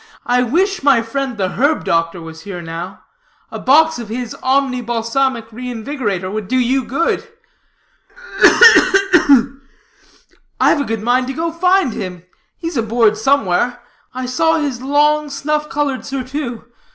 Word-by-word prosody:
I 245 0 +2
wish, 360 - 0
my 270 -5 +3
friend, 260 +1 -4
the 190 -2 -1
herb 285 - 0
doctor 165 +1 0
was 160 0 -10
here 190 -1 -7
now; 170 +2 -8 0.5
a - - -6
box 315 +3 +3
of 230 -3 -8
his 240 +1 -5
Omni 260 -1 0
Balsamic 230 0 -2
Reinvigorator 225 -5 -4
would 215 -1 -5
do 255 - 0
you 255 +2 +1
good." 335 - -2 1.1
"Ugh, - - +7
ugh, 385 0 +4
ugh!" 270 0 +3 1.0
"I've 290 - +3
a - - -2
good 225 -1 -4
mind 250 +2 +1
to 265 - -4
go 330 +4 -3
find 360 - +1
him. 180 -2 -6 0.3
He's 330 -4 -5
aboard 225 -1 +2
somewhere. 245 -1 0 0.3
I 255 0 -5
saw 320 +6 +1
his 280 -6 -3
long, 295 +2 +1
snuff 300 +2 -2
colored 280 -3 -2
surtout. 260 -3 -5
255 Hz, 150 wpm, -17 LUFS, 225-290 Hz, 1.1 s, Ugh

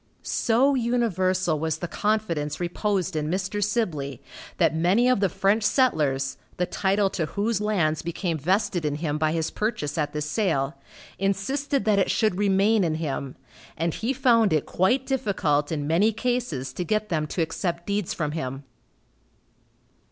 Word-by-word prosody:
So 250 +5 +2
universal 190 - +1
was 160 0 -1
the 175 - -4
confidence 205 -8 -1
reposed 185 +1 -1
in 150 0 -1
Mr. 190 +3 -1
Sibley, 155 - -1 0.4
that 165 -3 +3
many 185 +9 +3
of 255 -4 +3
the 195 -1 +2
French 200 +5 +2
settlers, 145 - +1 0.2
the 180 - +1
title 195 +2 +1
to 160 -4 -2
whose 210 +4 -1
lands 175 -8 +1
became 170 -1 -2
vested 185 +2 0
in 150 -1 -1
him, 150 -1 -2
by 155 0 +2
his 160 -1 -1
purchase 210 -9 -2
at 150 -1 0
this 150 0 -3
sale, 150 -5 0 0.5
insisted 210 +7 -1
that 210 -2 +3
it - - +2
should 215 -4 +1
remain 200 +1 +3
in 160 -2 0
him, 140 -4 -4 0.4
and 165 0 0
he 230 +4 -2
found 235 -5 +3
it 155 - +1
quite 245 +9 +1
difficult 190 - 0
in 145 -3 -2
many 175 +9 +3
cases 225 - -2
to 180 - -3
get 215 +4 -1
them 155 -3 0
to 165 - -1
accept 170 +1 -3
deeds 200 -2 -1
from 150 -2 -2
him. 135 -3 -4
185 Hz, 160 wpm, -25 LUFS, 155-215 Hz, 0.5 s, that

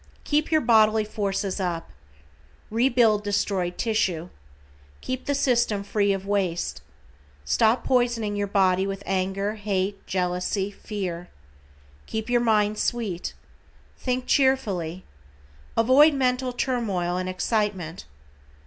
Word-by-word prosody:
Keep 300 +2 0
your 310 -1 +4
bodily 220 -2 +4
forces 200 -2 -2
up. 175 - -3 0.8
Rebuild 230 -3 +3
destroyed 195 -3 -1
tissue. 185 -7 0 0.7
Keep 255 0 -4
the 285 - +1
system 240 -7 +1
free 205 0 +1
of 195 0 -2
waste. 195 -4 -1 0.6
Stop 220 - +2
poisoning 240 -4 +1
your 205 0 -1
body 190 -1 +2
with 195 0 -5
anger, 195 +2 -1
hate, 200 -2 -2
jealousy, 180 +2 -1
fear. 185 -4 -5 0.8
Keep 220 +2 -4
your 240 -1 +3
mind 215 -2 +2
sweet. 215 -8 -2 0.6
Think 255 0 -2
cheerfully. 200 - +1 0.7
Avoid 275 +6 +6
mental 255 -1 +1
turmoil 215 -9 -1
and 185 0 -2
excitement. 185 -3 -2
205 Hz, 110 wpm, -25 LUFS, 190-240 Hz, 0.8 s, Avoid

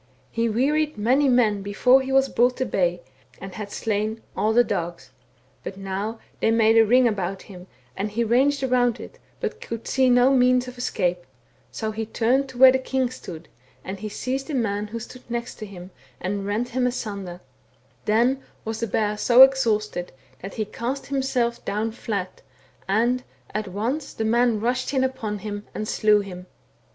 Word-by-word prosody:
He 230 0 0
wearied 295 +6 +1
many 260 +7 +3
men 220 -5 +3
before 250 +7 +4
he 265 0 -4
was 270 0 +4
brought 250 0 +2
to 260 - 0
bay, 175 -4 0 0.4
and. 195 0 -8
had 205 0 -7
slain 215 +1 -2
all 215 - +1
the 240 +2 +5
dogs. 175 -6 -4 0.5
But 190 - -6
now 195 +3 -4 0.2
they - - +2
made 225 0 +4
a 225 - +7
ring 250 +2 +5
about 195 -3 -2
him, 180 -2 -12 0.3
and 200 +2 -2
he 230 +3 -1
ranged 270 +5 +2
around 245 -2 +2
it, - - -11 0.2
but - - -4
could 230 0 -6
see 260 -1 +3
no 250 +2 +5
means 250 0 +3
of 250 0 -9
escape, 180 -7 -1 0.4
so 220 -1 -4
he 220 0 -4
turned 255 +5 +1
to 260 - -11
where 260 +1 +9
the 260 - +1
king 260 -1 -1
stood, 170 -9 -9 0.4
and 190 +1 -6
he 215 +1 -5
seized 265 +7 -3
a 295 - -2
man 210 -4 -1
who 230 +2 -5
stood 245 +2 -11
next 235 0 -4
him, 195 -4 -9 0.3
and 195 +2 -3
rent 220 +4 -1
him 250 +1 +1
asunder; 200 -7 -5 0.7
then 240 +5 +2 0.2
was 220 0 -3
the 230 - -1
bear 210 0 0
so 240 +4 +8
exhausted 215 -9 +1 0.3
that 195 - -7
he 215 - -1
cast 245 +6 -4
himself 260 -4 -1
down 215 +2 -2
flat, 205 -5 -4 0.5
and, 235 +6 +2 0.3
at 215 -1 -2
once, 235 +10 -3
the 220 - -2
men 235 0 +2
rushed 250 +4 -1
in 260 - +3
upon 255 -5 -2
him 205 0 -6
and 215 - -3
slew 210 -1 +3
him. 180 -2 -9
225 Hz, 180 wpm, -24 LUFS, 205-255 Hz, 0.7 s, where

